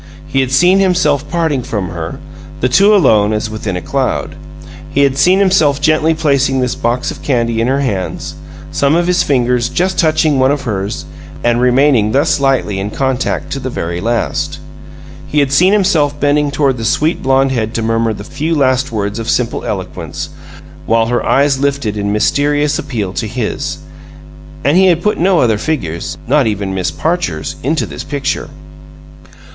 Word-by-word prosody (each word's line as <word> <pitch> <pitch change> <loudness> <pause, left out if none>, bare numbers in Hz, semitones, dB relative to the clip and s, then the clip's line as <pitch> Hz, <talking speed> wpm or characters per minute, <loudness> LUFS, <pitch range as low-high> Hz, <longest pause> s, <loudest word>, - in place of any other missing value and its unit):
He 140 -2 -1
had 130 -1 +1
seen 180 +8 +4
himself 155 -7 +1
parting 160 -5 0
from 105 -6 -4
her, 80 -1 -6 0.4
the 125 - +1
two 200 +11 +5
alone 110 - +3
as 110 +1 -2
within 105 -4 -4
a 90 - -6
cloud. - - -2 0.6
He 140 - +1
had 140 -1 +3
seen 180 +7 +4
himself 180 -8 +3
gently 155 +2 +2
placing 140 -4 +1
his 125 -1 0
box 120 +2 -1
of - - -10
candy 115 -4 0
in 115 - +1
her 135 +2 +1
hands, 100 -9 -3 0.4
some 140 +2 +2
of 175 0 +2
his 180 0 +2
fingers 125 -3 +1
just 185 +1 -1
touching 155 -3 +2
some 130 0 +4
of 145 0 -1
hers 100 -4 -3 0.4
and 120 0 +2
remaining 125 -4 +3
thus 140 +1 +2
lightly 135 -8 0
in 100 +1 -3
contact 130 +2 -2
to 135 - -3
the 130 0 -4
very 85 -7 -4
last. 140 +6 -1 0.7
He 150 - -4
had 140 -2 +1
seen 180 +7 +4
himself 165 -8 +2
bending 145 +1 +2
toward 140 -2 0
the 115 - -5
sweet 155 +8 0
blonde 135 0 +2
head 110 -4 -1
to 115 - -1
murmur 115 0 +1
the 105 - -6
few 150 +8 -2
last 130 -2 +1
words 105 0 -3
of 115 - -4
simple - - 0
eloquence, - - -5 0.6
while 115 0 +3
her 120 0 0
eyes 140 -1 +2
lifted 140 -6 -1
in 100 -1 -2
mysterious 145 +7 +1
appeal 110 -10 -4
to 110 - -3
his 120 0 -3 0.9
and 145 +6 +3
he 190 0 +5
had 175 -2 +2
put 210 - 0
no 180 0 +3
other 110 -4 +2
figures, 85 - -3
not 140 -1 +3
even 100 -2 -2
Miss 95 -1 -1
Parcher's, 155 - -2
into 155 +5 0
this - - -7
picture. 140 -1 -3
135 Hz, 180 wpm, -14 LUFS, 115-150 Hz, 0.9 s, two